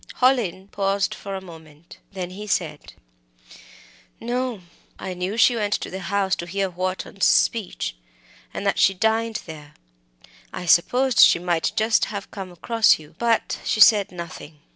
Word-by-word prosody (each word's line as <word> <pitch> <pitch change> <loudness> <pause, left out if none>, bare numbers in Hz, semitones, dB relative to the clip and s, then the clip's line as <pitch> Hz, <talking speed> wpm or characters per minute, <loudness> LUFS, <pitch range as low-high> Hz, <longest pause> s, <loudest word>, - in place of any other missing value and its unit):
Hallin 235 -8 +1
paused 195 0 -1
a 195 -1 -4
moment. 160 -3 -14
Then 185 -2 -6
he 205 +3 -8
said: 200 - -3 1.3
"No. 245 -2 -3 0.4
I 190 - -5
knew 180 +4 -4
she 245 +1 +5
went 210 -2 -1
to - - -5
the 190 - -5
House 195 +1 0
to 175 - -6
hear 195 +1 -2
Wharton's 185 +2 -2
speech, 210 - +1 0.6
and - - -6
that - - +1
she 195 - +4
dined 220 +2 0
there. 150 -3 -11 0.8
I - - -6
supposed 245 +10 +3
she - - +8
might 175 -1 -1
just 220 +1 +2
have 200 -2 -7
come 190 -3 -7
across 225 +5 +3
you 155 -1 -16
but 235 -1 0
she - - -1
said 210 -3 +6
nothing." 170 -3 -9
195 Hz, 150 wpm, -23 LUFS, 175-220 Hz, 1.3 s, she